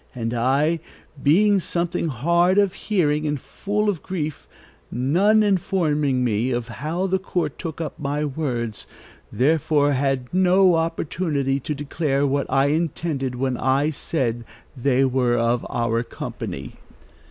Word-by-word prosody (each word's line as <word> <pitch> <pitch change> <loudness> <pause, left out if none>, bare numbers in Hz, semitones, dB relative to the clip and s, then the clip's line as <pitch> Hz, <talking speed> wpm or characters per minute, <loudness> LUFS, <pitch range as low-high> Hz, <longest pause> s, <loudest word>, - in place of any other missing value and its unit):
And 115 -1 -3
I, 140 +7 +2 0.4
being 200 +8 +4
something 175 -1 -1
hard 170 - +2
of 200 -2 +3
hearing 155 -7 0
and 150 -1 -1
full 210 +9 -2
of 195 -6 0
grief, 155 -6 -4 0.4
none 185 - +3
informing 155 -9 +1
me 115 +1 0
how 130 +9 -2
the 190 0 +1
court 175 -6 -3
took 165 -3 -5
up 155 -4 -5
my 145 +1 -1
words, 125 -7 -3 0.4
therefore 145 +1 +2
had 135 -1 -1
no 185 0 +5
opportunity 160 -4 -1
to 150 +3 -4
declare 145 0 -1
what 140 0 0
I 135 +1 +3
intended 150 -4 -1
when 130 0 -1
I 135 +4 +1
said 125 -6 -2 0.3
they 130 +1 +2
were 125 -2 +1
of 115 +1 0
our 115 -1 0
company." 70 - -6
145 Hz, 130 wpm, -23 LUFS, 130-170 Hz, 0.4 s, no